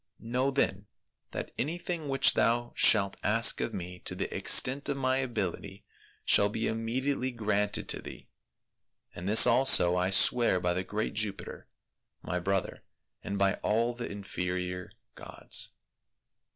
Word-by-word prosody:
Know 125 Hz, +4 st, -2 dB
then, 100 Hz, -8 st, -2 dB, 0.4 s
that -, -, -7 dB
anything 165 Hz, +1 st, -4 dB
which 135 Hz, 0 st, +3 dB
thou 120 Hz, +1 st, 0 dB
shalt 100 Hz, -3 st, +3 dB
ask 115 Hz, +3 st, +3 dB
of -, -, -3 dB
me 90 Hz, -2 st, -8 dB
to -, -, -4 dB
the -, -, -5 dB
extent 140 Hz, +3 st, +3 dB
of 140 Hz, -, -2 dB
my 130 Hz, -1 st, 0 dB
ability 100 Hz, -5 st, -5 dB, 0.4 s
shall 100 Hz, -, +4 dB
be 110 Hz, +2 st, -4 dB
immediately 125 Hz, +4 st, -2 dB
granted 105 Hz, -4 st, -2 dB
to -, -, 0 dB
thee; -, -, -12 dB, 0.9 s
and 90 Hz, +3 st, -6 dB
this 110 Hz, -, +8 dB
also 120 Hz, -8 st, +4 dB
I 90 Hz, +1 st, 0 dB
swear 100 Hz, +1 st, +5 dB
by 90 Hz, -1 st, -1 dB
the 90 Hz, +1 st, -3 dB
great 105 Hz, +3 st, -4 dB
Jupiter, 105 Hz, -2 st, -4 dB, 0.6 s
my 90 Hz, +2 st, -3 dB
brother, 95 Hz, +2 st, -3 dB, 0.4 s
and 100 Hz, -, -5 dB
by 100 Hz, 0 st, 0 dB
all 115 Hz, +3 st, 0 dB
the 120 Hz, 0 st, -7 dB
inferior 90 Hz, -2 st, -5 dB, 0.2 s
gods." -, -, -4 dB
110 Hz, 140 wpm, -28 LUFS, 95-125 Hz, 0.9 s, this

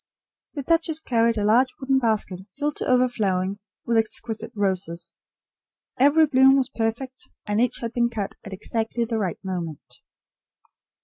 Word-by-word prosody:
The 285 Hz, -, -4 dB
duchess 325 Hz, +1 st, +1 dB
carried 230 Hz, -5 st, +1 dB
a 205 Hz, -, 0 dB
large 245 Hz, +5 st, +3 dB
wooden 265 Hz, -1 st, +2 dB
basket 215 Hz, -6 st, 0 dB, 0.2 s
filled 295 Hz, 0 st, -2 dB
to -, -, -2 dB
overflowing 205 Hz, -7 st, +1 dB, 0.3 s
with 230 Hz, -1 st, +1 dB
exquisite 220 Hz, 0 st, -2 dB
roses. 185 Hz, -4 st, -1 dB, 0.9 s
Every 290 Hz, +4 st, +6 dB
bloom 270 Hz, -2 st, +5 dB
was 260 Hz, -2 st, 0 dB
perfect, 240 Hz, +4 st, -4 dB, 0.2 s
and 210 Hz, +1 st, 0 dB
each 250 Hz, -, 0 dB
had 230 Hz, -1 st, -4 dB
been 235 Hz, -1 st, +2 dB
cut 210 Hz, -4 st, -4 dB
at 200 Hz, -, -9 dB
exactly 225 Hz, +4 st, -2 dB
the 225 Hz, -1 st, -2 dB
right 190 Hz, -4 st, -2 dB
moment. 175 Hz, -5 st, -6 dB
230 Hz, 145 wpm, -24 LUFS, 205-260 Hz, 0.9 s, Every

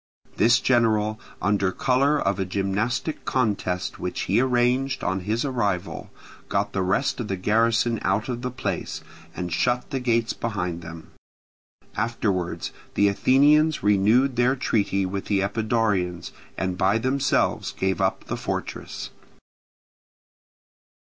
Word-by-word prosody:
This 120 Hz, +3 st, +5 dB
general, 110 Hz, -3 st, +2 dB, 0.2 s
under 100 Hz, -2 st, +2 dB
colour 135 Hz, +7 st, +2 dB
of 100 Hz, -4 st, 0 dB
a -, -, +1 dB
gymnastic 100 Hz, -, -2 dB
contest 100 Hz, -7 st, -1 dB
which -, -, -3 dB
he 105 Hz, -, +2 dB
arranged 130 Hz, +1 st, +1 dB
on 95 Hz, 0 st, 0 dB
his 115 Hz, +5 st, 0 dB
arrival, 105 Hz, -9 st, -2 dB, 0.4 s
got -, -, -1 dB
the 95 Hz, -, 0 dB
rest 100 Hz, +11 st, 0 dB
of 115 Hz, -, -3 dB
the 95 Hz, -, -1 dB
garrison 115 Hz, +4 st, +2 dB
out 100 Hz, +3 st, 0 dB
of 120 Hz, -1 st, -3 dB
the 125 Hz, -, -2 dB
place, 125 Hz, -, -4 dB, 0.3 s
and 90 Hz, -2 st, -4 dB
shut 125 Hz, -, 0 dB
the 135 Hz, -, -1 dB
gates 115 Hz, -2 st, +1 dB
behind 90 Hz, -7 st, -3 dB
them. 80 Hz, 0 st, -10 dB, 0.8 s
Afterwards 105 Hz, -6 st, -1 dB, 0.2 s
the 100 Hz, 0 st, +4 dB
Athenians 145 Hz, +8 st, +4 dB
renewed 110 Hz, +6 st, +3 dB
their 125 Hz, +2 st, +3 dB
treaty 100 Hz, -6 st, 0 dB
with 95 Hz, +1 st, -4 dB
the 100 Hz, -2 st, +1 dB
Epidaurians, 100 Hz, -4 st, 0 dB, 0.3 s
and 90 Hz, 0 st, -2 dB
by 100 Hz, +3 st, +3 dB
themselves 130 Hz, +4 st, 0 dB
gave 95 Hz, -1 st, -1 dB
up -, -, 0 dB
the -, -, -4 dB
fortress. -, -, -5 dB
110 Hz, 130 wpm, -24 LUFS, 95-125 Hz, 0.8 s, This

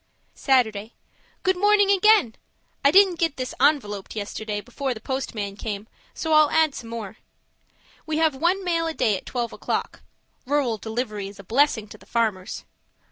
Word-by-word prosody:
Saturday 225 Hz, -5 st, +1 dB, 0.5 s
Good 375 Hz, 0 st, +2 dB
morning 410 Hz, +1 st, +4 dB
again! 400 Hz, -, +4 dB, 0.5 s
I 280 Hz, -, +6 dB
didn't 375 Hz, 0 st, +5 dB
get 330 Hz, -4 st, 0 dB
this 255 Hz, -1 st, -4 dB
ENVELOPED 210 Hz, -11 st, +1 dB
yesterday 210 Hz, 0 st, -4 dB
before 250 Hz, +4 st, -4 dB
the -, -, -8 dB
postman 220 Hz, -5 st, -4 dB
came, 210 Hz, -1 st, -5 dB, 0.3 s
so 320 Hz, -1 st, -1 dB
I'll 305 Hz, -1 st, +6 dB
add 320 Hz, -2 st, +3 dB
some 230 Hz, -4 st, -8 dB
more. 225 Hz, -2 st, -6 dB, 0.9 s
We 310 Hz, -1 st, -1 dB
have 320 Hz, -2 st, +3 dB
one 345 Hz, +8 st, 0 dB
mail 335 Hz, -2 st, 0 dB
a 320 Hz, -, -4 dB
day 215 Hz, -, +2 dB
at -, -, -8 dB
twelve 240 Hz, -2 st, -3 dB
o'clock. -, -, -3 dB, 0.5 s
Rural 265 Hz, -6 st, 0 dB
delivery 220 Hz, -3 st, -4 dB
is 200 Hz, -, -11 dB
a 200 Hz, -, -11 dB
blessing 235 Hz, 0 st, +2 dB
to 215 Hz, -, -12 dB
the -, -, -19 dB
farmers! 215 Hz, -6 st, -1 dB
255 Hz, 165 wpm, -24 LUFS, 215-320 Hz, 0.9 s, I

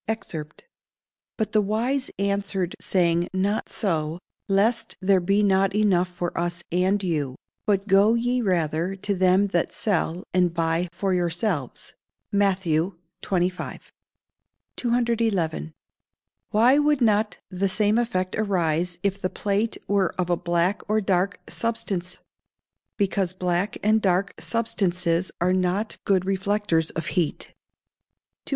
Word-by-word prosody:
[Verse: 220 Hz, -3 st, -3 dB, 1.0 s
"But 215 Hz, -2 st, -1 dB
the 215 Hz, -, +3 dB
wise 235 Hz, +6 st, 0 dB
answered 200 Hz, -2 st, -1 dB
saying, 175 Hz, -1 st, +2 dB
Not 200 Hz, +3 st, 0 dB
so; 160 Hz, -5 st, -1 dB, 0.3 s
lest 215 Hz, +5 st, +2 dB
there 190 Hz, 0 st, +3 dB
be 195 Hz, +4 st, +2 dB
not 195 Hz, 0 st, +2 dB
enough 195 Hz, -4 st, +3 dB
for 175 Hz, -1 st, -5 dB
us 175 Hz, +1 st, -2 dB
and 190 Hz, +3 st, +1 dB
you: 150 Hz, -7 st, -1 dB, 0.3 s
but 200 Hz, -1 st, +1 dB
go 205 Hz, +3 st, +5 dB
ye 245 Hz, +2 st, 0 dB
rather 175 Hz, -2 st, 0 dB
to 200 Hz, +1 st, -2 dB
them 185 Hz, +1 st, +3 dB
that 175 Hz, -3 st, 0 dB
sell, 185 Hz, -5 st, 0 dB
and 180 Hz, -2 st, +2 dB
buy 165 Hz, +1 st, 0 dB
for 190 Hz, +2 st, -1 dB
yourselves." 175 Hz, -, -2 dB, 0.4 s
MATT. 190 Hz, -5 st, +2 dB, 0.4 s
XXV.] 180 Hz, -1 st, -2 dB, 0.8 s
211. 230 Hz, -10 st, 0 dB, 0.8 s
Why 240 Hz, +6 st, +4 dB
would 295 Hz, -2 st, +2 dB
not 215 Hz, -2 st, +2 dB
the 190 Hz, +1 st, 0 dB
same 210 Hz, +3 st, +3 dB
effect 185 Hz, -6 st, -1 dB
arise 175 Hz, -4 st, 0 dB
if 200 Hz, 0 st, -1 dB
the 185 Hz, -, 0 dB
plate 210 Hz, +4 st, -1 dB
were 195 Hz, -3 st, +1 dB
of 180 Hz, -1 st, -1 dB
a -, -, +4 dB
black 175 Hz, +4 st, 0 dB
or 215 Hz, +1 st, +3 dB
dark 190 Hz, -1 st, 0 dB
substance? 190 Hz, -6 st, -2 dB, 0.8 s
Because 195 Hz, -3 st, 0 dB
black 180 Hz, +2 st, -1 dB
and 215 Hz, +1 st, +3 dB
dark 190 Hz, 0 st, +1 dB
substances 185 Hz, -6 st, 0 dB
are 180 Hz, +2 st, +2 dB
not 185 Hz, +4 st, 0 dB
good 190 Hz, -2 st, +2 dB
reflectors 195 Hz, -4 st, +1 dB
of 165 Hz, -, -4 dB
heat. 175 Hz, -5 st, -1 dB, 0.9 s
212. -, -, -7 dB
190 Hz, 130 wpm, -24 LUFS, 175-210 Hz, 1.0 s, go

